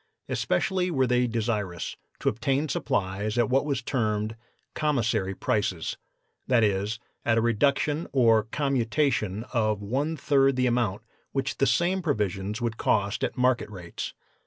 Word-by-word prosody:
Especially 185 -1 0
were 135 -6 +2
they 125 0 +2
desirous 110 -6 -2 0.3
to - - -3
obtain 135 +7 +1
supplies 105 -6 -1
at 120 +1 +2
what 135 +3 +2
was 135 -4 -1
termed 110 -3 -1 0.4
'commissary 115 -10 0
prices;' 95 -6 -1 0.5
that 120 -3 +4
is, 105 +2 +1 0.3
at 115 -1 +2
a - - +4
reduction 140 +7 +1
or 115 -5 +4
commutation 120 -5 0
of 110 -4 +1
one 140 +9 -1
third 135 -2 +3
the 125 0 +2
amount 120 -5 0 0.3
which 135 - -1
the 135 - +3
same 185 +2 +2
provisions 105 - -1
would 115 -2 -2
cost 100 -1 +1
at - - -2
market 125 -2 +2
rates. 90 -5 -7
120 Hz, 140 wpm, -27 LUFS, 105-135 Hz, 0.5 s, that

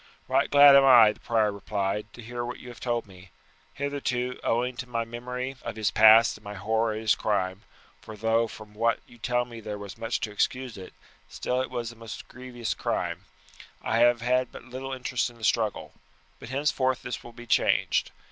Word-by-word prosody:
"Right - - +2
glad 145 -1 +8
am 140 - +7
I," 120 -5 +8
the - - -14
prior 110 -3 +1
replied, 100 +1 -3
"to 120 - -11
hear 120 +1 -5
what 120 +1 -5
you 125 - -11
have 120 - -11
told 120 -2 -1
me. 95 -1 -15 0.5
Hitherto, 130 -3 -2
owing 125 +2 0
to 130 - -6
my 115 -1 -2
memory 125 +3 -5
of 115 - -6
his 110 -2 0
past 110 +1 +7
and 105 - -21
my 105 0 -7
horror 110 +2 0
at 110 - -5
his 110 -2 +3
crime 95 -2 -1 0.4
for 110 - -10
though 115 +2 +2
from 105 -1 -12
what 115 +2 +1
you 120 - -18
tell 120 +1 0
me 120 -1 -10
there 105 -1 -6
was 100 +1 -9
much 115 0 -2
to 110 - -3
excuse 125 +4 -1
it, 95 -1 -10 0.4
still 125 +1 -2
it 130 - -4
was 120 -1 -4
a 115 -1 -12 0.2
grievous 120 -4 -5
crime - - -3 0.6
I 115 - +1
have 120 0 +4
had 125 +1 +1
but - - -11
little 130 +1 -7
interest 130 -1 -1
in 120 - -17
the 115 - -15
struggle, 110 0 0 0.5
but - - -10
henceforth 130 -2 0
this 120 - -5
will 120 - -11
be 120 0 -11
changed. 115 - +2
115 Hz, 205 wpm, -27 LUFS, 110-125 Hz, 0.6 s, glad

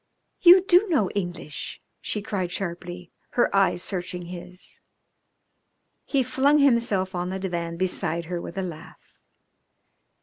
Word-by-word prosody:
"You 365 +1 +9
do 380 +2 +5
know 255 - +2
English?" 175 -3 -4 0.2
she 210 - -3
cried 185 -4 -2
sharply, 175 -1 -5 0.3
her 240 - +3
eyes 195 -2 +3
searching 180 -2 -3
his. 180 +1 -7 1.2
He 275 -2 +1
flung 270 +4 +3
himself 235 -9 +2
on 180 0 -2
the 190 - -3
divan 170 -3 -3
beside 170 -2 -1
her 175 +1 -4
with 170 - -8
a 190 - -1
laugh. 170 -4 -10
185 Hz, 130 wpm, -25 LUFS, 175-225 Hz, 1.2 s, You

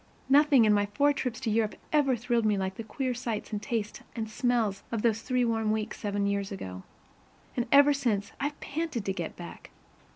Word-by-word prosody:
Nothing 280 -3 +6
in 210 - +5
my 205 0 +2
four 285 +8 +2
trips 250 -4 -3
to 220 - -1
Europe 215 -2 +1 0.2
ever 280 -4 +4
thrilled 240 0 0
me 210 -2 +2
like 190 0 -2
the 225 - -7
queer 255 +3 -2
sights 235 -3 -4
and 205 - -2
tastes 220 -3 -3
and 225 -2 -3
smells 220 -3 0
of 230 -3 -2
those 225 -2 +2
three 250 -1 +1
warm 225 -2 0
weeks 215 0 -2
seven 205 -1 -1
years 200 0 -1
ago. 95 - -6 0.7
And 240 -1 -1
ever 285 +1 +7
since, 230 -8 -1
I've 290 +1 -3
panted 300 -7 -3
to 195 - 0
get 175 -3 -5
back. 175 - -10
225 Hz, 200 wpm, -29 LUFS, 205-255 Hz, 0.7 s, ever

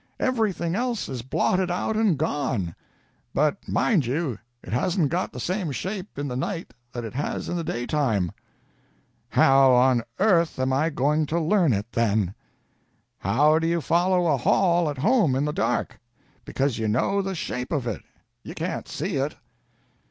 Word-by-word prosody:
Everything 215 -9 0
else 240 +1 -1
is 130 -3 -5
blotted 180 +9 0
out 180 +5 -1
and 215 -7 +2
gone. 130 - -1 0.6
But 150 +6 +1
mind 170 - +2
you, 135 - -2 0.2
it - - -7
hasn't 165 - +1
got - - -1
the 125 - -8
same 180 - -2
shape 190 - -5
in 145 0 -2
the 125 - -4
night 165 0 -4 0.2
that 120 - -5
it 110 - -7
has 140 +3 -3
in 175 - -2
the 170 - -2
daytime." 120 - 0 1.0
"How 135 -1 +5
on 125 -1 +4 0.2
earth 170 -6 +3
am 130 0 0
I 155 +5 +2
going 150 +1 +1
to 165 +3 0
learn 170 -1 +3
it, 105 +2 -2
then?" 105 -5 +1 0.9
"How 150 +5 +3
do 165 - 0
you 170 0 +1
follow 175 +4 +2
a 150 -4 +3
hall 170 +5 +2
at 145 - -5
home 200 - +3
in 135 +2 +1
the 150 - -1
dark? 125 -9 -1 0.5
Because 135 -3 -1
you 110 - -1
know 165 - +1
the 195 -1 -3
shape 125 -5 -4
of 145 -6 -1
it. 115 -5 -3 0.4
You - - -9
can't - - -4
see - - -3
it." - - -1
150 Hz, 170 wpm, -25 LUFS, 125-175 Hz, 1.0 s, How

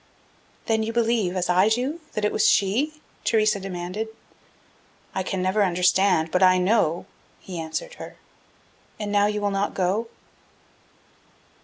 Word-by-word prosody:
"Then 220 -1 +1
you 220 +1 -2
believe, 225 -5 +1
as 185 -1 -1
I 185 +4 +4
do, 260 +9 -1
that 215 - -1
it 210 - +1
was - - +2
she?" 270 +11 +1 0.2
Theresa 215 -2 +2
demanded. 185 +3 -4 1.1
"I 190 - -1
can 185 0 -2
never 195 +3 +2
understand, 180 -2 +2
but 180 - +1
I 185 0 +6
know," 180 -3 +1 0.3
he 180 -3 -7
answered 160 - -4
her. - - -9 0.8
"And 210 -1 -3
now 205 0 +3
you 210 0 -1
will 205 0 0
not 195 +1 -1
go?" 195 +5 0
200 Hz, 145 wpm, -24 LUFS, 185-220 Hz, 1.1 s, I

